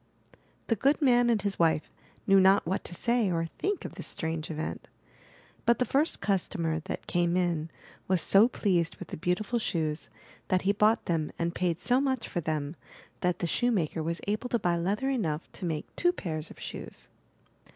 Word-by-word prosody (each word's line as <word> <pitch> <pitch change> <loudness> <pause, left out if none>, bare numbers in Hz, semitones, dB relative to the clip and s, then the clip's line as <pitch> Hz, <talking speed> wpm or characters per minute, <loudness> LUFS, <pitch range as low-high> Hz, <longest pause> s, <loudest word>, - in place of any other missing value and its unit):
The 230 - +1
good 275 +7 +2
man 245 -4 +4
and 230 -2 +3
his 200 -1 -2
wife 160 -2 +2 0.3
knew 195 0 +6
not 190 +1 +5
what 190 +4 -1
to 175 - -5
say 235 -1 +1
or 165 -1 0
think 405 -1 -1
of - - -6
this - - -5
strange 160 -1 -3
event. 155 0 -4 0.8
But 235 -1 +4
the 250 - +1
first 295 +6 +1
customer 175 -5 0
that - - -5
came 175 0 +1
in 170 -3 0 0.4
was 185 -1 +3
so 200 +7 +6
pleased 180 -8 0
with - - -10
the - - -5
beautiful 190 +8 0
shoes, 160 -7 -2 0.4
that 185 -1 +1
he 195 - +3
bought 215 +2 +3
them 160 -3 -1
and 170 0 -1
paid 175 -2 -1
so 250 +2 +3
much 265 -4 -1
for 175 - -2
them 155 -1 -2 0.4
that 180 -1 +1
the - - -2
shoemaker 180 -7 +1
was 165 +2 -3
able 215 +5 -2
to 240 - +2
buy 175 -5 +1
leather 200 +10 0
enough 165 - -1
to - - -7
make 155 -3 -2
two 350 - +3
pairs 160 - -5
of - - -13
shoes. - - -7
185 Hz, 190 wpm, -29 LUFS, 165-230 Hz, 0.8 s, knew